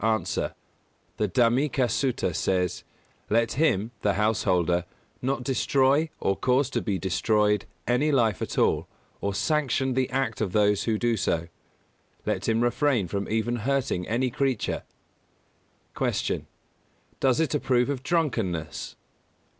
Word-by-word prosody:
_ 110 Hz, -4 st, 0 dB
A. -, -, -3 dB, 0.6 s
The 105 Hz, -, +1 dB
Dhammika 125 Hz, +5 st, +2 dB
Sutta 120 Hz, -5 st, 0 dB
says: 90 Hz, -2 st, 0 dB, 0.5 s
"Let 115 Hz, +1 st, +2 dB
him 120 Hz, -7 st, +1 dB
(the 100 Hz, -, +1 dB
householder) 90 Hz, -5 st, +1 dB, 0.4 s
not 130 Hz, 0 st, -1 dB
destroy, 135 Hz, +4 st, +2 dB
or 95 Hz, -, +1 dB
cause 130 Hz, +5 st, +1 dB
to -, -, 0 dB
be 100 Hz, -3 st, -1 dB
destroyed, 105 Hz, +2 st, +1 dB, 0.2 s
any 125 Hz, +6 st, +2 dB
life 115 Hz, -7 st, +2 dB
at -, -, -4 dB
all, -, -, +2 dB, 0.3 s
or 100 Hz, -1 st, -1 dB
sanction 135 Hz, -1 st, +1 dB
the 130 Hz, 0 st, 0 dB
act 130 Hz, -4 st, -1 dB
of 95 Hz, -4 st, -1 dB
those 105 Hz, -1 st, +3 dB
who 110 Hz, -2 st, +1 dB
do 120 Hz, +1 st, +1 dB
so. 85 Hz, -3 st, -1 dB, 0.8 s
Let -, -, -1 dB
him 115 Hz, +1 st, +2 dB
refrain 120 Hz, -, +1 dB
from 100 Hz, +2 st, -3 dB
even 115 Hz, +2 st, 0 dB
hurting 130 Hz, -6 st, -1 dB
any 125 Hz, +3 st, 0 dB
creature." 130 Hz, -2 st, -1 dB, 1.1 s
203. -, -, +1 dB, 0.3 s
Q. -, -, -13 dB, 0.8 s
_Does 130 Hz, 0 st, +3 dB
it 160 Hz, -1 st, +1 dB
approve 125 Hz, -4 st, +2 dB
of 135 Hz, -3 st, -3 dB
drunkenness? 115 Hz, -, -1 dB
115 Hz, 140 wpm, -26 LUFS, 100-130 Hz, 1.1 s, those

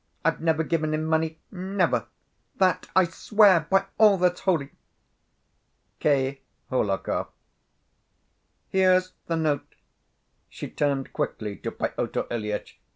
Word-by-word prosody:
I've -, -, +1 dB
never 160 Hz, -1 st, +2 dB
given 155 Hz, -1 st, 0 dB
him 155 Hz, 0 st, -2 dB
money, 160 Hz, 0 st, 0 dB
never: 190 Hz, 0 st, 0 dB, 0.5 s
That 185 Hz, -1 st, +2 dB
I 185 Hz, -, +7 dB
swear 185 Hz, -1 st, +4 dB
by 195 Hz, 0 st, +3 dB
all 210 Hz, -3 st, +7 dB
that's 180 Hz, 0 st, +2 dB
holy! 160 Hz, -7 st, 0 dB, 1.3 s
K. 135 Hz, -2 st, +1 dB, 0.3 s
HOHLAKOV. 105 Hz, -7 st, 0 dB, 1.4 s
"Here's 185 Hz, -1 st, +3 dB
the 165 Hz, -, 0 dB
note!" 155 Hz, -3 st, -1 dB, 0.7 s
she -, -, -8 dB
turned 140 Hz, -2 st, -1 dB
quickly 105 Hz, -2 st, -3 dB
to -, -, -4 dB
Pyotr -, -, -2 dB
Ilyitch. 105 Hz, -3 st, -4 dB
160 Hz, 110 wpm, -26 LUFS, 140-185 Hz, 1.4 s, I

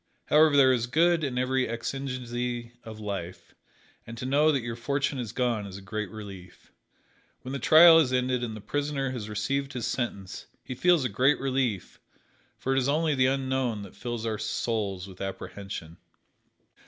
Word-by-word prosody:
However, 150 Hz, -1 st, +5 dB
there 130 Hz, -2 st, +6 dB
is 120 Hz, -1 st, 0 dB
good 165 Hz, +4 st, +3 dB
in 130 Hz, -4 st, -2 dB
every 130 Hz, 0 st, +1 dB
exigency 120 Hz, -1 st, -4 dB
of 110 Hz, -1 st, -9 dB
life, 100 Hz, -4 st, -6 dB, 0.5 s
and 115 Hz, 0 st, -8 dB
to 125 Hz, -, -5 dB
know 145 Hz, +4 st, +4 dB
that 135 Hz, -5 st, -1 dB
your 115 Hz, -1 st, -4 dB
fortune 140 Hz, +3 st, -1 dB
is 115 Hz, -4 st, -4 dB
gone 120 Hz, -5 st, -1 dB
is 95 Hz, -1 st, -8 dB
a -, -, -10 dB
great 105 Hz, 0 st, -4 dB
relief. 95 Hz, -4 st, -11 dB, 0.7 s
When 130 Hz, -, -6 dB
the 140 Hz, -, -3 dB
trial 165 Hz, +5 st, +8 dB
is 140 Hz, -6 st, +2 dB
ended 125 Hz, -1 st, 0 dB
and 110 Hz, -2 st, -4 dB
the -, -, -10 dB
prisoner 140 Hz, +3 st, -2 dB
has 110 Hz, -5 st, -5 dB
received 135 Hz, +7 st, -2 dB
his 125 Hz, -2 st, -3 dB
sentence, 100 Hz, -6 st, -4 dB, 0.2 s
he 130 Hz, -, -6 dB
feels 170 Hz, +1 st, +3 dB
a -, -, +3 dB
great 130 Hz, +7 st, +2 dB
relief, 130 Hz, -8 st, -2 dB, 0.6 s
for 135 Hz, -, -1 dB
it -, -, +4 dB
is 130 Hz, +1 st, 0 dB
only 155 Hz, +1 st, +2 dB
the 130 Hz, -2 st, +3 dB
unknown 130 Hz, -5 st, -1 dB
that 100 Hz, -, -12 dB
fills 120 Hz, -2 st, -5 dB
our 110 Hz, -2 st, -2 dB
souls 105 Hz, -3 st, -2 dB
with 95 Hz, -1 st, -12 dB
apprehension. 95 Hz, -3 st, -6 dB
125 Hz, 180 wpm, -27 LUFS, 110-135 Hz, 0.7 s, trial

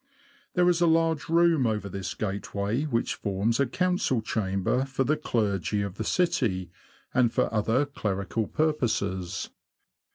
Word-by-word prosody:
There 180 Hz, -1 st, +4 dB
is 175 Hz, -1 st, +3 dB
a 170 Hz, -, +5 dB
large 165 Hz, -1 st, +2 dB
room 165 Hz, -5 st, +4 dB
over 105 Hz, -2 st, -1 dB
this 95 Hz, -1 st, -5 dB
gateway, 100 Hz, +5 st, -2 dB
which 120 Hz, -6 st, 0 dB
forms 105 Hz, +4 st, -1 dB
a 140 Hz, -, +3 dB
council 180 Hz, -5 st, +1 dB
chamber 105 Hz, +2 st, 0 dB
for 135 Hz, 0 st, -1 dB
the 150 Hz, +4 st, +2 dB
clergy 105 Hz, -, -1 dB
of 100 Hz, -1 st, -6 dB
the 110 Hz, -, -2 dB
city, 120 Hz, -, 0 dB, 0.4 s
and 125 Hz, -3 st, +3 dB
for -, -, 0 dB
other 115 Hz, +6 st, +2 dB
clerical 105 Hz, -5 st, -2 dB
purposes. 110 Hz, -, -1 dB
115 Hz, 140 wpm, -27 LUFS, 100-155 Hz, 0.4 s, a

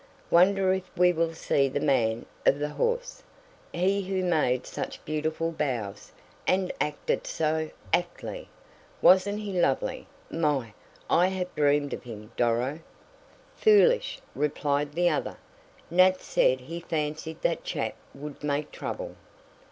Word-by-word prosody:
"Wonder 190 Hz, +2 st, +5 dB
if 190 Hz, -1 st, -4 dB
we 180 Hz, 0 st, +5 dB
will 165 Hz, 0 st, 0 dB
see 140 Hz, -3 st, +2 dB
the -, -, -1 dB
man 115 Hz, -5 st, +1 dB, 0.2 s
of 140 Hz, -, +4 dB
the 150 Hz, +1 st, -2 dB
horse? 485 Hz, -, -2 dB, 0.5 s
He 190 Hz, +3 st, +1 dB
who 190 Hz, -1 st, -2 dB
made 150 Hz, -8 st, +1 dB
such -, -, -6 dB
beautiful 155 Hz, +2 st, -1 dB
bows, 120 Hz, -10 st, -3 dB, 0.4 s
and 185 Hz, 0 st, +2 dB
acted 150 Hz, 0 st, -1 dB
so 155 Hz, 0 st, 0 dB, 0.2 s
actly. 175 Hz, -, -2 dB, 0.5 s
Wasn't 200 Hz, +3 st, +5 dB
he 205 Hz, -2 st, -5 dB
lovely? 135 Hz, -, 0 dB, 0.2 s
My, 145 Hz, -9 st, 0 dB, 0.3 s
I 175 Hz, +2 st, +4 dB
have 185 Hz, -1 st, -3 dB
dreamed 145 Hz, -1 st, +2 dB
of -, -, -5 dB
him, 110 Hz, -2 st, -10 dB
Doro!" 120 Hz, +5 st, +1 dB, 0.8 s
"Foolish," 475 Hz, +2 st, +4 dB, 0.2 s
replied 145 Hz, 0 st, 0 dB
the 175 Hz, +2 st, +2 dB
other. 155 Hz, -4 st, -1 dB, 0.5 s
"Nat 185 Hz, +1 st, +5 dB
said 130 Hz, 0 st, +2 dB
he 165 Hz, +6 st, -6 dB
fancied 155 Hz, -1 st, -3 dB
that -, -, 0 dB
chap -, -, -2 dB, 0.2 s
would 145 Hz, +1 st, -9 dB
make 145 Hz, 0 st, -1 dB
trouble." -, -, -5 dB
160 Hz, 130 wpm, -27 LUFS, 145-185 Hz, 0.8 s, Wonder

